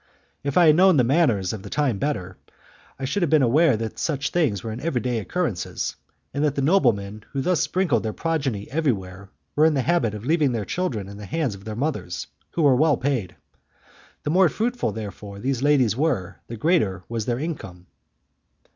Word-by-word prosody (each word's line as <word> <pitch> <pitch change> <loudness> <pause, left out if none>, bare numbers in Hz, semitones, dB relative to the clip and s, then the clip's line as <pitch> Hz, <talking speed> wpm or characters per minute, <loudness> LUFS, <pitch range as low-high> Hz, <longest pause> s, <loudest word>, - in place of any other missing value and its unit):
If 140 +2 -1
I 175 - +7
had 155 -1 +7
known 185 -1 +6
the 125 - +5
manners 120 - +2
of 110 - -6
the - - -9
time 135 -9 0
better, 95 -11 -2 0.6
I 135 - -4
should 140 +10 -1
have 170 - +2
been 155 -2 +4
aware 135 +1 +4
that 115 0 -5
such 150 -3 -1
things 135 - +1
were 115 - -4
every 145 -3 -1
day 120 -1 -1
occurrences, 120 - -2 0.4
and 145 - -1
that 150 -3 +1
the 140 - 0
noblemen 110 - +2
who 135 - -1
thus 180 +4 +1
sprinkled 175 - +1
their 110 - -2
progeny 135 -8 -2
everywhere 100 - -2 0.3
were 155 - +5
in 160 - +2
the 135 - +1
habit 120 -11 +1
of 105 +2 -8
leaving 150 -3 +2
their 110 -3 -2
children 115 - -2
in 100 0 -9
the 105 - -8
hands 155 -8 -1
of 100 0 -12
their 110 -1 -5
mothers, 130 - -3 0.3
who 165 - 0
were 140 -3 +6
well 150 0 +3
paid. 120 - -2 0.9
The 150 - -1
more 185 0 +5
fruitful, 240 - -1
therefore, 105 -1 -7
these 130 +3 -2
ladies 135 -6 +3
were, 130 - -1
the 115 - -7
greater 105 - +1
was 115 -2 -3
their 120 -1 0
income. 110 - -6
130 Hz, 200 wpm, -24 LUFS, 105-155 Hz, 0.9 s, I